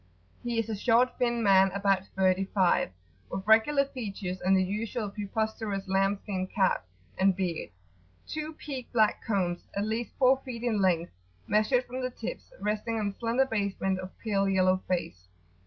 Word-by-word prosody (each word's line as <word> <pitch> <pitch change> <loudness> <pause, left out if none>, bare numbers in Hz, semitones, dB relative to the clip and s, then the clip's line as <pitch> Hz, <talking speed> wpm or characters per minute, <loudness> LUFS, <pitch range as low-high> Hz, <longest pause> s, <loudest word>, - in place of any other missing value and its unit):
He 240 -1 -2
is 225 -1 0
a 220 - -2
short, 240 +4 +2
thin 235 -1 +1
man 195 -1 +6
about 195 -1 +1
thirty 190 0 +2
five, 190 - +2 0.4
with 190 - -4
regular 250 +7 +5
features 200 -8 -5
and 190 +1 +4
the 190 - +3
usual 210 +2 -3
preposterous 210 -1 -3
lamb 195 +1 +2
skin 185 -3 -3
cap 185 - +1 0.3
and 190 0 +4
beard, 180 -4 -2 0.6
two 310 0 -4
peaked 270 -5 -7
black 215 -3 +3
cones 180 -5 -1
at 200 +1 0
least 225 +2 -3
four 260 0 +5
feet 245 -3 -6
in 220 -4 +1
length, 175 -3 +2 0.3
measured 215 +5 +2
from 255 +1 -5
the 255 - -1
tips, - - -7
resting 215 +2 -1
on 205 -1 0
a 195 - -11
slender 235 +3 +2
basement 200 -5 -1
of 185 0 -8
pale 195 -3 0
yellow 185 -1 +3
face. 95 - -3
205 Hz, 170 wpm, -29 LUFS, 190-235 Hz, 0.6 s, man